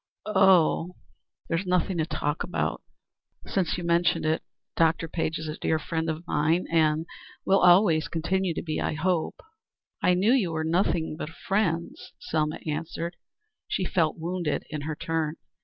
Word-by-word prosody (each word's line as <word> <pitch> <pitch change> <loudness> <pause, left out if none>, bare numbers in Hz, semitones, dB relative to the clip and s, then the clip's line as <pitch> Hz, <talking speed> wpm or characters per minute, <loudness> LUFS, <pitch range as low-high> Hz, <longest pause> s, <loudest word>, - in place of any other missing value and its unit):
"There's 170 +3 -1
nothing 180 0 +1
to 160 - 0
talk 145 0 -2
about. 180 - -2 0.6
Since 180 -4 -1
you 175 - -5
have 170 - -2
mentioned 170 -1 +2
it, 155 +1 +1 0.3
Dr. 165 0 +2
Page 160 0 -2
is 160 - -6
a 155 - -5
dear 160 - +1
friend 160 +1 -2
of 160 +2 -4
mine, 165 +1 +1
and 160 -1 +2 0.4
will 195 +1 +4
always 175 -3 +5
continue 175 +2 -1
to - - -3
be, 155 -2 -2
I - - -1
hope." 170 +1 0
"Oh, - - -26 0.6
I 180 - +4
knew 200 +7 +3
you 195 -11 +1
were 160 0 -1
nothing 160 -1 0
but 155 - -5
friends 170 -1 -2
now," - - -50
Selma 155 -1 -1
answered. 165 +2 -4 0.5
She 185 - -1
felt 165 -3 +1
wounded 170 -2 -2
in 150 -1 -3
her 155 - -2
turn. 160 0 -2
165 Hz, 165 wpm, -27 LUFS, 155-180 Hz, 0.6 s, always